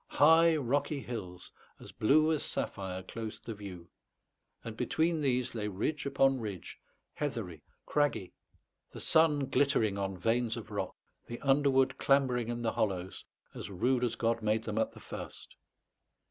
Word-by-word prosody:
High 160 +2 +6
rocky 145 +1 0
hills, 90 -8 -7 0.3
as - - -11
blue 155 +8 +3
as 155 - +1
sapphire, 95 -2 -3
closed 110 +3 -7
the 115 - -4
view, 95 -5 -9 0.8
and 115 -1 -6
between 160 +6 0
these 125 -3 0
lay 105 -3 -3
ridge 135 +9 -2
upon 135 -1 +3
ridge, 100 -6 -6 0.3
heathery, 115 - -4 0.2
craggy, 145 -11 0 0.6
the - - -10
sun 150 -3 +4
glittering 115 -8 +2
on 95 -1 -2
veins 115 +4 0
of 115 - -8
rock, - - -3 0.3
the 120 - -6
underwood 135 -1 +3
clambering 130 -4 +2
in 120 0 -3
the 115 - +1
hollows, 95 -3 -2 0.3
as - - -7
rude 125 +7 +1
as 120 -2 0
God 115 0 0
made 110 +1 +1
them 110 -1 -2
at 110 - 0
the - - -12
first. - - -8
120 Hz, 150 wpm, -31 LUFS, 105-140 Hz, 0.8 s, High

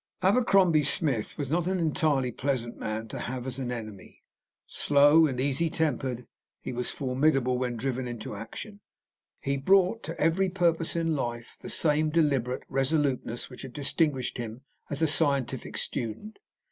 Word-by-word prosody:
Abercrombie 190 -6 +4
Smith 140 -5 0
was 140 -2 -3
not 175 +1 +1
an 190 0 0
entirely 150 -6 +1
pleasant 120 -4 -2
man 110 +1 -4
to - - -6
have 125 -1 -4
as 130 0 -4
an 125 -2 -3
enemy. 110 -5 -8 0.4
Slow 145 +3 +5
and 130 -3 -3
easytempered, 140 -3 0 0.3
he - - -6
was 125 0 -2
formidable 130 -2 +1
when 125 -1 -1
driven 125 0 -3
to 110 - -7
action. 205 - -8 0.6
He 140 0 -1
brought 190 +8 +3
to 165 - -6
every 185 +4 +2
purpose 170 -3 +1
in 165 -1 +1
life 120 -3 -4
the - - -7
same 155 0 +2
deliberate 140 -6 +1
resoluteness 135 -3 0
which 125 - -11
had 130 -3 -8
distinguished 145 -3 0
him 115 +1 -6 0.3
as 145 +2 -1
a - - +5
scientific 140 -4 0
student. 120 - -4
140 Hz, 150 wpm, -28 LUFS, 125-160 Hz, 0.6 s, Slow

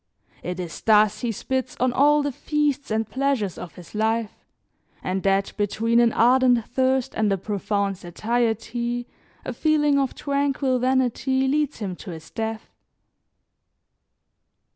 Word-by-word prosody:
It 180 +1 -5
is 170 -4 -6
thus 215 -1 +4
he 240 - -1
spits 260 +3 -3
on 255 0 +2
all 295 +2 +4
the 285 - -1
feasts 290 +1 -1
and 220 0 0
pleasures 255 -5 -1
of 175 - -9
his 180 -2 -13
life, 220 +1 0 0.7
and 185 +1 -1
that 195 0 +1
between 220 +3 +1
an 235 -1 +4
ardent 245 -1 +4
thirst 260 0 0
and 215 -2 +1
a 195 - +2
profound 200 0 -2
satiety 235 +5 -2 0.4
a - - -3
feeling 295 -2 +2
of 270 -2 -1
tranquil 280 -2 0
vanity 260 +1 +1
leads 295 +1 0
him 195 -5 -4
to 200 - -10
his 160 -2 -9
death. 220 0 -4
235 Hz, 140 wpm, -24 LUFS, 210-265 Hz, 0.7 s, thus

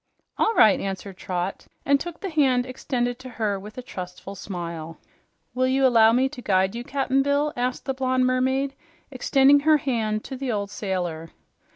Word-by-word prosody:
"All 450 - +2
right," 215 -2 +6
answered 195 -1 -5
Trot, 180 0 -4 0.2
and 280 0 +4
took 345 +1 -7
the 390 -3 -4
hand 265 -5 +2
extended 245 -1 -2
to 260 0 -9
her 210 -5 -2
with 210 +4 -11
a 255 - -6
trustful 180 -2 -8
smile. 170 -4 -6 0.6
"Will 255 +1 +1
you 265 +1 +2
allow 225 -3 +6
me 255 +3 +3
to 265 -3 -9
guide 190 -3 +2
you, 235 +1 -5
Cap'n 270 0 0
Bill?" 285 +2 +1
asked 250 +1 -2
the 270 - -1
blonde 255 -1 +1
mermaid, 260 +2 +1 0.4
extending 275 +2 +4
her 305 +1 +4
hand 225 -6 -1
to 265 - -7
the 260 -1 -3
old 200 -2 -3
sailor. 175 -5 -3
250 Hz, 180 wpm, -24 LUFS, 195-270 Hz, 0.6 s, right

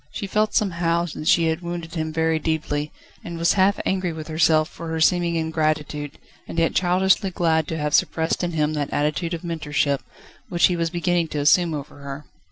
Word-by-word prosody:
She 205 - -5
felt 210 +2 0
somehow 170 -3 +1
that 155 - -6
she 165 - +5
had 160 +2 -2
wounded 170 -1 -6
him 160 -2 -2
very 160 0 +1
deeply, 150 -2 -2 0.3
and 170 -1 -6
was 170 0 +3
half 195 +1 +3
angry 185 -2 0
with 160 0 -7
herself 155 0 +3
for 165 - -9
her 160 0 -2
seeming 170 +1 +2
ingratitude, 155 -2 -1 0.3
and - - -7
yet 165 -1 +2
childishly 190 +2 +2
glad 160 -3 +1
to 160 - -3
have 150 -1 -2
suppressed 160 +2 +1
in 175 -1 -1
him 155 -1 +1
that 145 -2 -2
attitude 155 +4 -1
of 165 - -9
mentorship, 150 -4 -1 0.5
which 175 -1 +3
he 180 - 0
was 165 -1 0
beginning 175 0 0
to 150 - -5
assume 160 +3 +3
over 145 0 -8
her. 140 +1 -7
165 Hz, 195 wpm, -23 LUFS, 155-175 Hz, 0.5 s, she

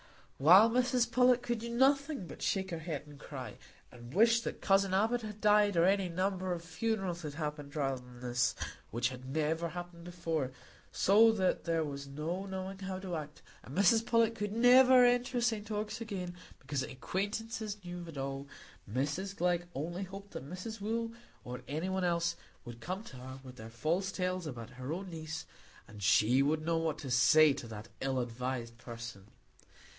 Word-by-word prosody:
While 185 +11 +8
Mrs 245 -1 +2
Pullet 250 0 +4
could 240 -1 -1
do 235 +1 -5
nothing 275 - +2
but - - -10
shake 190 -1 0
her 165 - -3
head 155 -3 -4
and 145 -1 -13
cry, 130 -7 -8 0.3
and 120 -1 -11
wish 225 - +5
that - - -5
cousin 195 -1 +3
Abbot 225 +5 +2
had 215 -1 -7
died, 210 -2 +4
or 165 - +5
any 195 -1 +2
number 185 +1 -1
of 170 -1 -3
funerals 180 +1 -2
had 150 -3 -6
happened 150 -2 -5
rather 135 -3 -1
than 125 -1 -14
this, 120 -1 +1 0.3
which 120 +1 0
had 130 0 -9
never 160 +3 0
happened 175 -1 -8
before, 165 -6 -2 0.4
so 220 +4 +6
that 190 -4 0
there 165 -1 +1
was 140 -2 -5
no 165 +7 -4
knowing 190 0 -5
how 190 -1 -4
to 185 -2 -4
act, 150 -1 -7 0.2
and 135 - -9
Mrs 215 +3 +5
Pullet 230 -1 +3
could 210 -3 -3
never 250 +2 +7
enter 245 +1 +2
St 225 -3 0
Ogg's 215 +2 -3
again, 190 -6 -4 0.2
because 135 0 -3
"acquaintances" 205 - -3
knew 175 0 -5
of 175 - -8
it 160 -3 -9
all, 135 +1 -4 0.4
Mrs 150 - -2
Glegg 175 -1 +1
only 170 +7 -3
hoped 195 +1 -8
that 135 - -7
Mrs 200 +5 -6
Wooll, 230 +2 -1 0.3
or 125 +1 -6
any 155 +6 -2
one 190 0 -1
else, 170 -1 +1 0.3
would 120 -1 -9
come 185 - -4
to 130 - -11
her 130 +1 -9
with 130 -1 -11
their 110 +1 -9
false 165 +11 -1
tales 185 -2 -2
about 120 -4 -7
her 130 +2 -6
own 185 +2 -4
niece, 160 -1 -5 0.4
and 105 0 -11
she 105 +6 +4
would 155 +2 +1
know 165 0 +1
what 160 -2 -1
to 135 -4 -6
say 145 +4 +6
to 135 -4 -7
that 110 +1 -8
ill 135 -1 0
advised 120 -1 -4
person! 115 -5 -8
175 Hz, 185 wpm, -33 LUFS, 135-205 Hz, 0.4 s, While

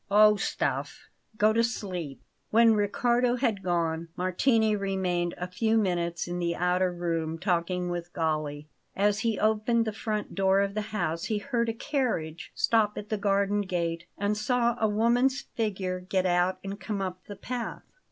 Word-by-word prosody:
"Oh, 210 +1 +6
stuff! 200 - -3 0.3
Go 215 +1 +4
to 230 +1 +3
sleep." 180 - -4 0.3
When 230 0 +6
Riccardo 240 +4 +2
had 230 -6 0
gone, 170 -2 -1
Martini 215 +4 +2
remained 185 -3 -1
a 180 - -3
few 220 +5 +1
minutes 175 -5 0
in 175 0 -3
the 170 -1 0
outer 180 +1 +1
room, 165 -2 -2
talking 180 0 0
with 175 0 -4
Galli. 155 -3 -2 0.3
As 205 +1 +2
he 225 -2 0
opened 220 +2 +2
the 220 - -2
front 215 -1 -3
door 195 0 +3
of 200 0 -1
the 215 - -1
house 165 -6 -2
he 215 - 0
heard 235 0 -1
a - - -1
carriage 225 - -2
stop 215 -2 +2
at 210 - -6
the 215 - 0
garden 200 0 +2
gate 170 -3 -2
and 205 +1 0
saw 235 +2 +1
a 220 - +3
woman's 240 +5 +2
figure 190 -5 -3
get 185 +1 -1
out 180 +1 +2
and 195 +1 -5
come 210 -2 -3
up 185 -1 -4
the 205 - -7
path. 240 +4 -5
200 Hz, 170 wpm, -28 LUFS, 175-220 Hz, 0.3 s, Oh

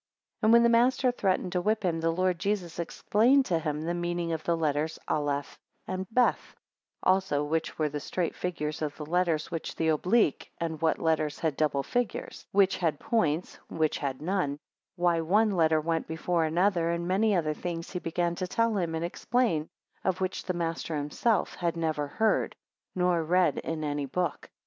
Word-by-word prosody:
7 - - -1
And - - +6
when 235 0 +7
the 235 - +5
master 250 +1 +3
threatened 190 -5 0
to 180 -1 0
whip 215 +3 0
him, 170 -3 0
the 165 0 +1
Lord 180 +1 +1
Jesus 190 -4 -2
explained 235 +10 +3
to 170 -7 +1
him 150 -1 -3
the 170 +2 -1
meaning 175 -1 -2
of 160 - -4
the 170 -1 +1
letters 155 0 0
Aleph 145 -2 -2 0.3
and 185 0 -4
Beth; 245 +2 +1 0.5
8 - - +4
Also 185 -7 0
which 160 +2 -2
were 155 - +1
the 145 0 -4
straight 170 +3 -2
figures 155 -4 -3
of 150 -2 -3
the 150 - -6
letters, 165 -1 0
which 165 -2 -4
the 160 - +1
oblique, 180 - +2
and 165 -2 -3
what 160 -1 +2
letters 155 -2 0
had 160 -4 -1
double 145 -2 +1
figures; 245 - -3
which 195 -1 +3
had 160 -5 0
points, 175 -7 0
and - - -8
which 155 -1 +1
had 140 0 -3
none; 175 -6 0 0.4
why 175 -2 +2
one 210 +6 +3
letter 160 -4 +3
went 165 +1 -1
before 165 +1 0
another; 170 +1 +2
and 170 0 -1
many 200 +3 +2
other 155 -3 +1
things 165 +1 -5
he 180 - -3
began 170 0 -1
to 180 +1 -3
tell 230 +3 +1
him, 170 -3 -1
and 165 +1 -1
explain, 175 -4 0 0.3
of 190 -1 0
which 185 0 -2
the 185 - -1
master 165 -1 -2
himself 175 +8 0
had 170 -1 -2
never 155 -3 -1
heard, 220 +9 +1 0.4
nor 180 -2 +2
read 175 -2 +2
in 160 -1 -4
any 145 -1 -2
book. 180 +5 -2
170 Hz, 190 wpm, -28 LUFS, 155-185 Hz, 0.5 s, when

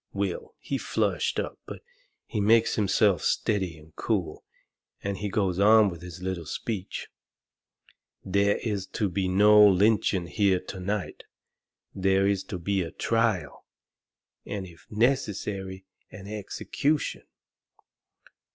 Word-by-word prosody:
Will, 460 -1 -3
he - - -4
flushed - - 0
up, - - -4
but - - -8 0.4
he 105 - -3
makes 115 +2 +4
himself 100 -1 +2
steady 95 -6 0
and 75 0 -18
cool, - - -2 0.6
and 100 -1 -2
he 105 +1 -3
goes 95 -3 0
on 105 0 +6
with 85 -1 -9
his 90 0 -9
little 90 -4 -3
speech: 100 0 -4 1.2
"There 100 +2 +2
is 100 -4 -2
to 105 - 0
be 95 +1 -1
no 105 +3 +6
lynching 100 -2 +4
here 95 +1 +2
to 95 +1 -8
night. 100 +1 -4 0.7
There 95 0 +2
is 100 -1 +1
to 95 - -5
be 95 +3 -1
a 85 - -3
trial, 110 -11 -1 0.8
and, 100 -2 -5
if 85 -2 -16
necessary, 105 -5 -1 0.2
an 100 -2 -11
execution." 110 +8 -2
100 Hz, 125 wpm, -27 LUFS, 95-105 Hz, 1.2 s, on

